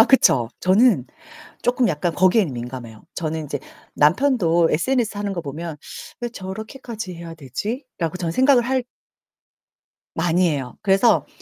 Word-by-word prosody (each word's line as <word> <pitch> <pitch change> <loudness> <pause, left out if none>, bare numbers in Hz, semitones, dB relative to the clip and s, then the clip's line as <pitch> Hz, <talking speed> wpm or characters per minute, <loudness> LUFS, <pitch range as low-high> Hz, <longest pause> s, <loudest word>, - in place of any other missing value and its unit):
아 - - +9
그쵸 125 - +4
저는 190 - +4 0.6
쪼끔 245 0 +2
약간 165 0 -1
거기에는 185 - +3
민감해요. 120 -2 -7
저는 160 -2 -3
이제 145 - -3 0.4
남편도 175 - +3
SNS 225 +5 +1
하는 205 -1 -2
거 180 - -3
보면 160 +1 -6 0.4
'왜 240 - -2
저렇게까지 220 0 -7
해야 170 -1 -8
되지.'라고 170 - -4
저는 170 -2 -2
생각을 260 +3 +5
할 260 +1 0 1.3
많이 175 +2 +2
해요. 135 -5 -3
그래서 195 +4 +4
180 Hz, 300 characters per minute, -22 LUFS, 155-235 Hz, 1.3 s, 아